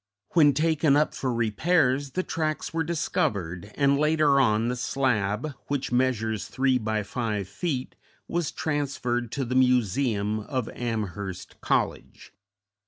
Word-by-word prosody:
When 150 -4 +5
taken 155 -1 +3
up 150 +1 +2
for 130 - -2
repairs 130 +4 +1
the 185 - 0
tracks 155 -2 -2
were 165 0 0
discovered, 100 - -2
and 140 -1 +3
later 150 -2 +3
on 110 -3 +3
the 125 - -1
slab, 125 0 0
which 140 -2 -2
measures 115 -5 0
three 130 -1 +1
by 110 -1 -1
five 105 -2 -3
feet, 130 - -3 0.3
was 170 -2 -1
transferred 130 -6 -2
to 135 -2 -1
the 125 - -3
museum 120 -4 +2
of 125 +2 -3
Amherst 100 -5 -5
College. - - -2
130 Hz, 130 wpm, -26 LUFS, 110-145 Hz, 0.3 s, When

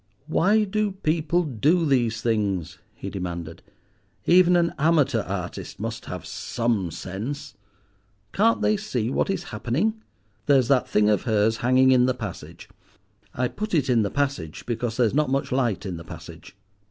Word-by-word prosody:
"Why 200 +7 +3
do 210 0 -1
people 170 -1 0
do 155 - +1
these 120 -6 +1
things?" 100 -8 -1 0.2
he - - -7
demanded. 85 -3 -5 0.6
"Even 180 0 +5
an 170 -1 +2
amateur 145 -6 +3
artist 90 -2 -6
must - - -5
have - - -6
some 115 -7 -1
sense. 95 - -6 0.8
Can't 225 +3 +2
they 215 - +3
see 130 - -2
what - - 0
is 190 -3 -1
happening? 165 - -1 0.5
There's 135 -4 +4
that 135 -3 +3
thing 105 0 +3
of 105 -3 +2
hers 110 0 +2
hanging 130 +2 +4
in 125 -1 +5
the 130 - +1
passage. 105 -7 -8 0.7
I 125 0 +1
put 210 - -4
it 135 -4 +2
in 120 -2 +4
the 100 - 0
passage 135 - -2
because 120 -1 -3
there's 120 -4 +2
not 150 -1 +2
much 135 +1 -1
light 125 -7 0
in 90 -3 -4
the 85 - -9
passage. - - -11
125 Hz, 160 wpm, -24 LUFS, 105-160 Hz, 0.8 s, Even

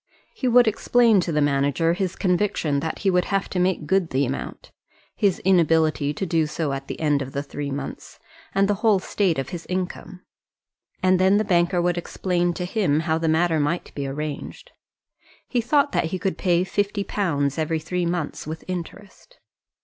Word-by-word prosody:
He 260 - -2
would 245 -1 +5
explain 225 0 +3
to 175 -1 -1
the 150 -1 +2
manager 145 +3 +1
his 185 0 -2
conviction 180 -6 0
that 160 +3 -3
he 195 - +4
would 180 0 +2
have 195 -1 -1
to 180 - -2
make 180 -3 +1
good 190 0 +1
the 135 +2 +1
amount, 130 +2 -6 0.4
his 200 -4 +2
inability 160 -5 +3
to 170 +6 -3
do 165 -3 +1
so 150 -2 -2
at 135 0 -5
the - - -6
end 150 -3 +1
of 135 0 -6
the 140 - -2
three 145 0 -5
months, 140 0 -6 0.4
and 195 0 +3
the 205 - +2
whole 220 -3 +4
state 185 -2 0
of 135 - -3
his 175 -1 -7
income; 185 0 -4 0.8
and 185 0 +4
then 190 +2 +4
the 215 - +2
banker 175 -1 +2
would 175 0 +1
explain 175 0 -1
to 180 - -3
him 180 -7 +1
how 160 -1 0
the 165 - -1
matter 160 0 +2
might 150 +4 -2
be 140 -1 -4
arranged. 150 - -6 0.8
He 245 - 0
thought 285 +4 +2
that - - +1
he 170 +3 -3
could 190 +1 -2
pay 180 -1 +1
£50 190 -8 -1
every 160 0 0
three 175 +2 -2
months 170 -4 -3
with 160 +1 -6
interest. 185 - -8
175 Hz, 190 wpm, -23 LUFS, 155-190 Hz, 0.8 s, would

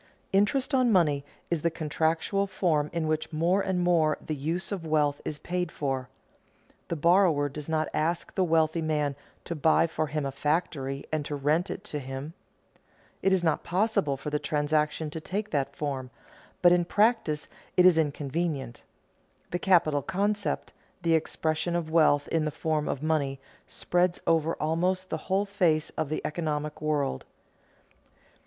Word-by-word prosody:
Interest 255 +9 +2
on 255 -3 +4
money 150 -7 +3 0.3
is 170 -3 +1
the 170 - +2
contractual 160 +5 0
form 155 -6 +1
in 165 -2 -1
which 155 +1 -1
more 170 +5 +2
and 190 -2 -1
more 165 -4 +3
the 155 - -5
use 165 +8 -2
of 195 -4 -3
wealth 150 -2 +1
is 150 - -4
paid 180 +2 -3
for. 135 -3 -3 0.8
The 170 - -2
borrower 170 -2 +4
does 150 +2 -7
not 155 -1 +1
ask 170 +2 -1
the 190 - +1
wealthy 160 -1 +2
man 150 -3 0 0.3
to - - -3
buy 160 +1 +3
for 160 -1 -2
him 150 -1 -2
a 135 - -2
factory 140 -2 -1
and 155 -1 0
to 145 - -3
rent 150 +6 +1
it 195 - -5
to 150 -8 -4
him. 135 +3 -6 0.9
It 195 - +2
is 190 -2 +2
not 160 -2 +2
impossible 190 -6 0
for 150 +2 -5
the 150 - 0
transaction 150 +1 0
to 160 - -5
take 205 +6 -4
that 140 -1 -1
form; 135 -4 -3 0.5
but 175 - +8
in 175 0 +4
practice 205 -6 +1 0.3
it 180 - +6
is 175 -3 +6
inconvenient. 145 -3 -2 0.7
The 175 - -1
capital 165 -6 +3
concept, 200 +3 -1 0.3
the 165 -1 +3
expression 160 +1 0
of 165 -2 -2
wealth 155 -3 +4
in 160 -2 +1
the - - 0
form 155 0 -1
of 140 - -3
money, 145 -4 0 0.3
spreads 180 0 0
over 165 0 +2
almost 180 +4 -1
the - - 0
whole 195 +2 +2
face 170 -6 +1
of 155 -3 -3
the 155 - -3
economic 150 -2 -3
world. 145 - -1
160 Hz, 165 wpm, -28 LUFS, 150-175 Hz, 0.9 s, but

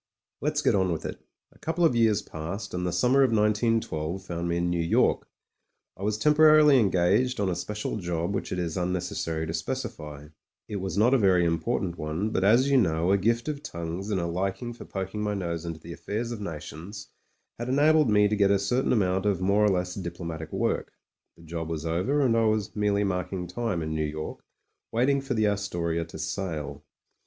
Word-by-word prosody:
Let's 150 +1 0
get - - +3
on 95 -3 +2
with 80 - -3
it. - - -6 0.3
A - - -23
couple 165 +2 0
of 130 - +3
years 110 -3 +3
passed, 85 +7 -6
and 90 0 -2
the - - -1
summer 125 +10 +3
of 135 - +5
191 110 +1 +2
2 80 +1 -4
found 85 -1 -3
me 85 - 0
in 85 0 0
New 85 -1 0
York. 85 - +2 0.7
I - - -14
was 105 +1 0
temporarily 150 +1 +6
engaged 100 +5 +2
on 100 -2 +1
a 90 - -1
special 105 +5 -4
job 85 -1 -2
which - - -3
it - - -2
is 85 -2 -2
unnecessary 90 -3 -2
to 80 - -4
specify. 75 - -5 0.4
It 105 - -4
was 95 +1 -4
not 115 +5 +4
a 135 - +5
very 95 -4 +4
impor 80 -1 0
tant 90 -2 -4
one, 80 +8 -2
but, 95 - 0
as 115 +7 +5
you 140 -1 +4
know, 85 -3 +1
a 100 - +5
gift 115 +5 +1
of 150 -2 -3
tongues 85 - -5
and 100 -3 0
a 85 - -1
liking 95 +7 -2
for 115 - -11
poking 95 +2 -4
my 105 -1 -1
nose 85 -3 -3
into 80 -1 -5
the 85 +1 -9
affairs 115 +7 -4
of 115 -3 -5
nations 85 +3 -7 0.5
had 120 +1 -3
enabled 150 +1 +4
me 105 -1 +5
to 105 - 0
get 100 -1 +3
a 100 - +4
certain 120 +8 +1
amount 95 -3 +1
of 100 -4 +1
more 100 +3 +2
or 105 - +5
less 90 -1 0
diplomatic 85 -3 -6
work. - - -1 0.4
The 85 - -16
job 80 0 -5
was 80 -1 -4
over, 95 - +1
and 125 -4 +3
I 115 0 +3
was 110 -2 0
merely 105 -1 +1
marking 90 -1 -2
time 90 -1 -2
in 80 0 -3
New 80 0 0
York 75 +1 -5 0.5
waiting 135 +4 +2
for 135 -2 -3
the 110 -1 +2
Astoria 85 -5 -1
to 80 - -10
sail. 80 -2 -4
95 Hz, 210 wpm, -27 LUFS, 85-110 Hz, 0.7 s, temporarily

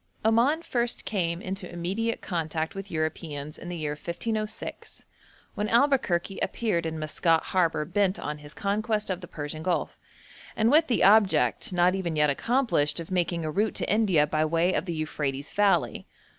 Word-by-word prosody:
Oman 245 +9 +3
first 240 -4 0
came 175 -3 -1
into 190 -1 -5
immediate 195 +7 -2
contact 160 -2 -2
with 195 0 -7
Europeans 155 -2 -4
in 175 - -8
the 175 - -4
year 150 -2 -2
1506, 215 +8 -5 0.5
when 210 +1 -2
Albuquerque 230 -8 +2
appeared 175 -8 -1
in 160 0 -4
Maskat 160 +2 +1
harbour 170 -4 +1
bent 190 +3 +1
on 150 +1 -4
his 145 0 -10
conquest 210 +1 -1
of 185 0 -3
the 175 - -8
Persian 150 0 -5
Gulf, 180 +1 -2 0.6
and 225 +2 +3
with 320 +2 +5
the 240 - +2
object, 205 -1 +4
not 180 0 +3
even 180 -4 -2
yet 150 -1 +3
accomplished, 230 - +1
of 165 +2 -8
making 175 -2 0
a 155 - -2
route 210 +7 0
to - - 0
India 195 -9 +3
by 155 +1 0
way 165 +3 +2
of 155 - -1
the 170 -3 -3
Euphrates 145 -3 -3
valley. 205 -1 +1
175 Hz, 170 wpm, -27 LUFS, 160-210 Hz, 0.6 s, with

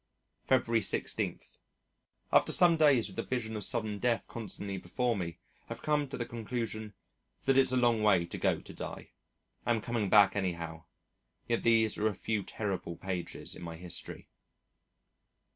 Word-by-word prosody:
February 115 -3 +3
16. - - -1 0.9
After - - +5
some 175 -2 +6
days 145 -7 +5
with 95 - -11
the - - +1
vision 115 -3 -3
of 105 - -2
sudden 110 -4 -1
death 120 0 0
constantly 100 -3 -6
before 120 +7 -1
me, 85 -4 -4 0.3
have - - -7
come 150 -1 +1
to 135 - -6
the 120 - -2
conclusion 110 -3 -4 0.5
that 135 - +3
it's 135 -1 +4
a 130 - +2
long 120 -3 +3
way 100 -5 +4
to - - -6
go - - +2
to - - -11
die. - - -7 0.5
Am 120 -1 +1
coming 110 -2 -1
back 100 -1 +6
anyhow. 85 -4 -3 0.6
Yet 115 -1 +1
these 115 -2 +3
are 110 - +2
a 105 - -1
few 110 +2 -1
terrible 95 -4 -4
pages 90 -1 -4
in - - -10
my 85 -1 -6
history. 85 +1 -4
110 Hz, 160 wpm, -31 LUFS, 95-120 Hz, 0.9 s, some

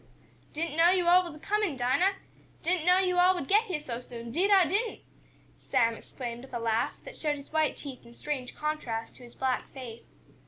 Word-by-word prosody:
"Didn't 320 0 -3
know 335 +1 +7
yo' 365 -1 +2
all 360 +1 +6
was 340 -4 -8
a - - -12
comin', 410 -4 0
Dinah! 260 +11 +2 0.5
Didn't 350 -1 0
know 360 0 +7
yo' 365 -1 +2
all 365 +1 +6
would 285 -7 -4
get 425 +3 +4
heah 360 -8 -2
so 245 -6 -5
soon, 235 -1 -8
'deed 365 - +2
I 390 -3 +6
didn't!" 415 +8 -1 0.6
Sam 230 -1 +1
exclaimed, 240 +1 -7
with 265 - -9
a - - -1
laugh, 225 -1 0
that - - -10
showed 300 -2 -1
his 280 +1 -12
white 315 -1 +2
teeth 270 -3 -8
in 235 0 -15
strange 265 -3 -4
contrast 280 -7 -3
to - - -16
his 240 - -13
black 260 -1 -1
face. 240 -4 -10
300 Hz, 210 wpm, -29 LUFS, 245-360 Hz, 0.6 s, know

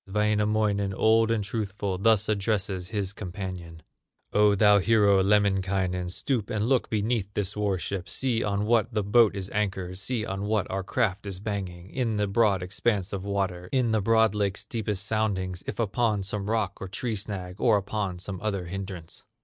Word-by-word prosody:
Wainamoinen, 105 -1 +1
old 110 +2 +4
and 115 -2 +1
truthful, 100 -3 -3
Thus 110 0 +3
addresses 100 -3 0
his 100 -2 -3
companion: 90 -4 -7 0.5
"O 105 0 +5
thou 105 0 +6
hero, 100 -2 +4
Lemminkainen, 95 -2 +1
Stoop 110 +3 -2
and 110 0 -1
look 130 -1 +2
beneath 110 -1 -1
this 100 0 -1
war 105 -2 0
ship, 90 0 -4
See 120 +2 0
on 100 0 0
what 115 +1 +2
this 105 -2 0
boat 105 +1 +4
is 95 -1 -5
anchored, 95 -3 -2
See 115 +1 -2
on 95 -1 -4
what 105 -1 +1
our 95 +1 -1
craft 100 -1 -1
is 95 -2 -4
hanging, 95 -3 -4
In 115 -5 -1
this 105 - +1
broad 100 -2 +2
expanse 95 +1 -1
of 95 -1 -3
water, 95 -3 -2
In 125 -4 +2
the 110 -1 +2
broad 110 0 +3
lake's 100 -2 -1
deepest 105 -3 -2
soundings, 95 -5 -1
If - - -4
upon 110 -1 +1
some 100 +1 -3
rock 110 -3 -1
or 95 - -4
tree 110 +4 -2
snag, 95 -2 -5
Or 110 -4 +5
upon 100 -2 -3
some 95 +1 -6
other 100 -4 -2
hindrance." 95 -2 -6
100 Hz, 175 wpm, -27 LUFS, 95-110 Hz, 0.5 s, thou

